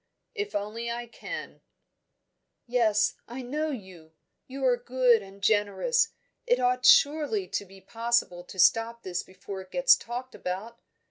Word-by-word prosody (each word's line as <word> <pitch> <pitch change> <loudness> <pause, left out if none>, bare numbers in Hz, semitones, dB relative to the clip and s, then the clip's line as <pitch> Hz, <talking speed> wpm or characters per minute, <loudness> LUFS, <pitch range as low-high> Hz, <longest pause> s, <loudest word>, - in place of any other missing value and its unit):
"If 420 -2 -4
only 215 +3 -3
I 240 +1 -4
can!" 235 - -8 1.0
"Yes! 225 -4 +2
I 250 +2 -7
know 300 +5 -2
you! 185 - -9 0.3
You 265 +1 -4
are 250 -1 +4
good 245 -1 +3
and 195 0 -14
generous 220 - +2 0.4
It - - +3
ought 250 0 +2
surely 315 +7 +4
to 200 - -2
be 195 0 -16
possible 230 -6 -1
to 190 - -12
stop 225 +5 +3
this 180 -1 -3
before 190 +1 -9
it 185 - -14
gets 265 +4 +5
talked 245 +2 -7
about? 200 +6 -5
235 Hz, 145 wpm, -27 LUFS, 200-260 Hz, 1.0 s, gets